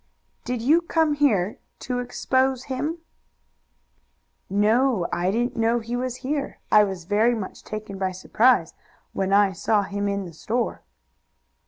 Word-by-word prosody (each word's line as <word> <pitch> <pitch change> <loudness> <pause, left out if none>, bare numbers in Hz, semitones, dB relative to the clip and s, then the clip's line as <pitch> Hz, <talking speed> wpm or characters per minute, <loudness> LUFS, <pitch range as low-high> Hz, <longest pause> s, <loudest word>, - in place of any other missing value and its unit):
"Did 245 -2 -3
you 310 +7 +4
come 320 -2 +1
here 220 -10 +1 0.2
to 250 -1 -2
expose 260 +1 0
him?" 290 +5 -3 1.5
"No; 215 +1 +2
I 180 +1 0
didn't 240 +5 -1
know 230 +1 +2
he 235 +1 -4
was 250 0 -2
here. 285 0 -2
I 210 0 +7
was 190 -4 -4
very 215 +5 +2
much 205 -4 -7
taken 215 -2 -7
by 190 -1 0
surprise 215 0 +2 0.4
when 190 0 -1
I 200 0 +5
saw 205 +3 +1
him 200 +1 -3
in 200 -1 -2
the 170 - -10
store." 230 +9 -2
225 Hz, 145 wpm, -24 LUFS, 200-255 Hz, 1.5 s, I